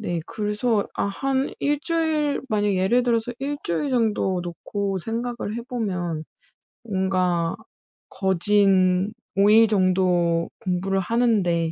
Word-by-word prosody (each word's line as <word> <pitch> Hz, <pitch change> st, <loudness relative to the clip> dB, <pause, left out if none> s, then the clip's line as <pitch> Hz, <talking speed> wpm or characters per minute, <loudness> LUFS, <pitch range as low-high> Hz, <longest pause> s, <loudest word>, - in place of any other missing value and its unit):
네 175 Hz, -6 st, -2 dB
그래서 210 Hz, +1 st, -1 dB
아 -, -, -1 dB
한 270 Hz, +6 st, -1 dB
1 290 Hz, 0 st, 0 dB
주일 315 Hz, -3 st, 0 dB
만약 210 Hz, -2 st, +1 dB
예를 195 Hz, +7 st, +2 dB
들어서 235 Hz, 0 st, 0 dB
1 285 Hz, +2 st, -2 dB
주일 170 Hz, -, -1 dB
정도 215 Hz, -6 st, +1 dB
놓고 195 Hz, +3 st, -3 dB
생각을 230 Hz, +1 st, -4 dB
해 235 Hz, -, -4 dB
보면 180 Hz, -, -3 dB, 0.6 s
뭔가 185 Hz, -5 st, 0 dB, 0.5 s
거진 190 Hz, 0 st, +2 dB, 0.2 s
5 200 Hz, +1 st, +4 dB
일 225 Hz, +1 st, +7 dB
정도 180 Hz, -4 st, +2 dB
공부를 190 Hz, +1 st, -1 dB
하는데 190 Hz, -6 st, +1 dB
200 Hz, 205 characters per minute, -23 LUFS, 185-235 Hz, 0.6 s, 일